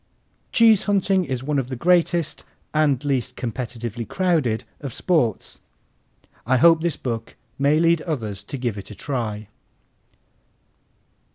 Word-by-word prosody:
Cheese 225 -3 +5
hunting 195 -2 +2
is 130 -3 -3
one 145 0 0
of 130 -1 -4
the 130 - -3
greatest 170 +2 +1 0.3
and 145 -3 +2
least 130 -3 -1
competitively 120 -1 -5
crowded 160 -12 0 0.2
of 140 -5 -6
sports. 135 - 0 0.8
I 130 +3 +2
hope 165 +4 +6
this 170 -2 -1
book 115 -3 -5 0.2
may 140 +2 +3
lead 165 0 +3
others 110 - -4
to 140 - -6
give 120 -5 -3
it 100 - -10
a 105 - -9
try. 110 -5 -4
135 Hz, 130 wpm, -23 LUFS, 115-165 Hz, 0.8 s, hope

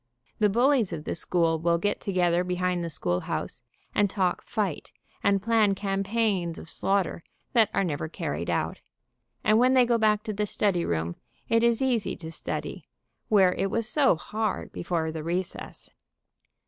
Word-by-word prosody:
The 210 -1 +4
bullies 240 -1 +3
of 160 -3 -5
the - - -3
school 165 -1 +1
will 170 +1 +2
get 205 +4 -1
together 180 -2 +1
behind 180 -1 -1
the 170 - -3
school 90 - -1
house - - -4 0.3
and 205 -1 +3
talk 185 -2 0
fight, 205 -8 -3 0.3
and 200 -1 +2
plan 220 -3 +3
campaigns 195 -3 -1
of - - -9
slaughter 195 -4 0 0.3
that 225 -4 +5
are 195 - +1
never 155 -3 -2
carried - - -4
out, - - -1 0.6
and 215 +1 +4
when 255 +2 +4
they 255 -1 +6
go 235 -1 +2
back 215 -1 +3
to 215 - -3
the 210 +1 -1
study 190 -4 +1
room, 85 +1 -2 0.3
it 230 0 +4
is 235 +1 +2
easy 245 -5 0
to 160 -1 -8
study, - - -5 0.4
where 190 -4 +5
it 195 +1 -1
was 230 +2 -1
so 275 - +4
hard 215 +7 -3
before 165 -2 -2
the 160 0 -5
recess. 175 +3 -4
195 Hz, 170 wpm, -27 LUFS, 170-220 Hz, 0.6 s, they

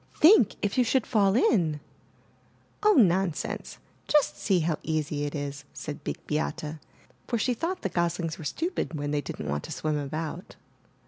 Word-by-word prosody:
Think, 315 - +6
if 205 +4 +1
you - - +6
should 245 +1 +1
fall 200 -4 +3
in!" 170 -11 +3 1.0
*'0h, 425 -4 +5
nonsense; 180 -2 -1 0.3
just 300 -1 +3
see 190 -4 +1
how 160 -1 0
easy 150 -2 -1
it 145 - -4
is," 140 -1 -4
said 150 -1 -7
Big - - -5
Beate, 150 +1 -2 0.6
for 235 - 0
she 250 +3 +1
thought 335 +9 -3
the - - +1
goslings 170 -1 -1
were - - -7
stupid 330 - -2
when 145 -1 -2
they 145 -1 +1
didn't 75 - -6
want 75 +1 -2
to - - -8
swim 155 -1 -1
about. 155 +4 -5
170 Hz, 170 wpm, -27 LUFS, 150-225 Hz, 1.0 s, Think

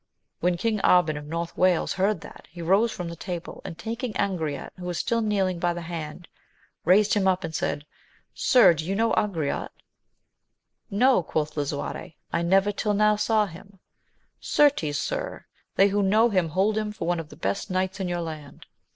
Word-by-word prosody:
When 175 0 +1
King 220 +3 0
Arban 180 -5 +4
of 145 0 -7
North 165 +2 -4
Wales 180 -2 +2
heard 195 -1 0
that, - - -13
he 175 - -13
rose 200 +7 +3
from 170 -1 -5
table; 175 0 -6
and 165 - -7
taking 230 +2 -4
Angriote, 160 -10 -2
who 180 - -7
was 175 -2 -3
still 230 0 0
kneeling, 195 -5 0
by 175 0 0
the 175 - -5
hand, 165 0 -6 0.6
raised 200 +4 +5
him 200 -2 +2
up 185 0 +2
and 165 -1 -5
said. 145 -1 -2 0.5
Sir, 245 -8 +5
do 160 -1 -4
you 190 +4 -2
know 225 +2 +2
Angriote? 165 -9 -1 1.2
No, 245 +2 +4
quoth 155 -2 -2
Lisuarte: 145 +1 -4 0.2
I 170 - +1
never 195 +4 +3
till 205 0 -1
now 210 +1 +4
saw 215 0 +2
him. 195 +2 -13 0.4
— - - -44 0.2
Certes, 270 - +4
sir, - - -4 0.3
they 195 +1 +5
who 205 +1 +1
know 215 +4 +4
him 185 -4 +1
hold 195 +6 +1
him^ 215 -1 -2
for 165 - -4
one 175 -1 +1
of 160 -2 -7
the - - -12
best 100 +1 -3
knights 185 +1 -1
in 190 - -2
your 175 0 -2
land. 155 -3 -8
185 Hz, 185 wpm, -25 LUFS, 165-210 Hz, 1.2 s, raised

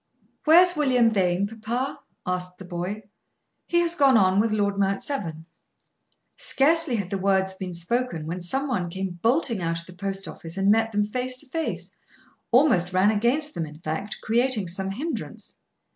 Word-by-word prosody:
"Where's 350 +3 +7
William 255 -6 +3
Vane, 185 -2 +1
papa?" 225 +5 -3 0.3
asked 180 0 -3
the 190 - -10
boy. 180 +5 -4 0.6
"He 345 0 +3
has 340 -1 +1
gone 275 -7 +5
on 190 -1 +4
with 220 +1 +2
Lord 200 -2 0
Mount 195 0 +1
Severn." 165 - -3 0.9
Scarcely 315 -1 +2
had 200 -4 -3
the 195 - -1
words 190 0 +1
been 185 -2 -6
spoken, 175 -1 -2
when 175 +3 -4
some 270 +11 -1
one 185 -10 -1
came 185 0 -5
bolting 235 - +1
out 165 0 -1
of 170 - -14
the 180 - -12
post 195 +1 -4
office, 165 +2 -8
and 195 +1 +3
met 225 +1 +2
them 210 -1 +1
face 250 +4 -3
to - - -11
face; 325 +4 -4 0.5
almost 230 - +4
ran 190 +3 +4
against 255 +8 +1
them 165 - -3
in 150 0 -11
fact, 160 +5 -4
creating 235 -2 +1
some 190 +3 -2
hindrance. 285 +12 -5
205 Hz, 175 wpm, -25 LUFS, 180-255 Hz, 0.9 s, Where's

